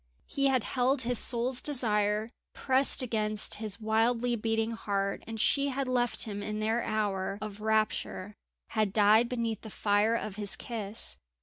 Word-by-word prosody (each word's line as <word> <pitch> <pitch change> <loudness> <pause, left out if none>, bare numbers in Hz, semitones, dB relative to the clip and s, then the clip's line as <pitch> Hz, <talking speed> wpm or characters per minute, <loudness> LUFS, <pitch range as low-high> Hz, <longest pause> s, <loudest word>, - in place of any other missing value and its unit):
He 275 0 0
had 260 -4 +2
held 255 +1 0
his 245 -1 +2
soul's 245 +1 +2
desire 215 -5 +1 0.2
pressed 265 0 +3
against 215 -3 -1
his 215 -1 -2
wildly 230 +2 +1
beating 225 0 -1
heart, 200 -3 -2
and 225 -1 -6
she 280 +5 +2
had 275 -1 -2
left 245 -2 0
him 205 -2 -5
in 210 +1 -4
their 220 +2 0
hour 200 -3 -2
of 210 -1 -7
rapture; 215 -2 -1 0.4
had 215 -3 0
died 215 +3 +4
beneath 230 -3 -2
the 220 - -9
fire 205 +2 +1
of 215 -3 -4
his 205 -2 +1
kiss. 215 - -1
220 Hz, 160 wpm, -29 LUFS, 210-245 Hz, 0.4 s, died